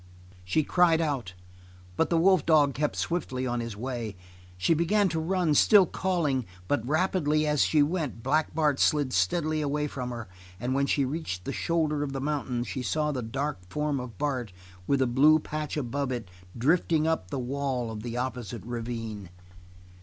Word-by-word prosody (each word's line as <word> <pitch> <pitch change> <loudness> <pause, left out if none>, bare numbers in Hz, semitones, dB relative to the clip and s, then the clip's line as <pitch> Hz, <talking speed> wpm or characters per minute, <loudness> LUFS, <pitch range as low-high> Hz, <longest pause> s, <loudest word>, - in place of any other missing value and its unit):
She 125 +13 +1
cried 170 0 +3
out, 135 - -2 0.6
but 160 - +1
the 170 - +2
wolf 185 -1 +4
dog 150 -4 +4
kept 150 +2 -1
swiftly 130 -7 -2
on 120 -1 -1
his 115 -3 -5
way. 120 -3 -4 0.4
She 95 - +3
began 190 +5 +2
to 165 - -2
run, 170 -1 +1
still 195 +6 +6
calling, 155 - -1 0.2
but 145 -6 0
rapidly 155 -1 +1
as 150 -2 +2
she 150 -2 +4
went, 145 -8 -2
Black 155 0 +1
Bart 150 -3 +2
slid 145 -4 +2
steadily 155 - +1
away 150 0 -1
from 130 -4 -4
her, 120 -3 -6 0.3
and 125 +4 -1
when 140 +1 +1
she 140 -1 +2
reached 130 - -4
the - - -3
shoulder 155 -3 0
of 140 -2 -3
the 135 - -3
mountain, 135 -4 -2
she 130 - -4
saw 150 +3 0
the 130 -3 -3
dark 135 +3 -3
form 150 +1 -1
of 125 -5 -8
Bart 130 -8 -2 0.4
with 140 -1 +2
the - - +4
blue 140 +6 +5
patch 155 0 -4
above 140 0 -2
it 120 -7 -4 0.3
drifting 155 +4 +2
up 160 - 0
the - - -3
wall 130 -2 -2
of 105 -1 -6
the 120 +1 -5
opposite 120 -5 -4
ravine. 115 -4 -5
140 Hz, 180 wpm, -28 LUFS, 120-155 Hz, 0.6 s, still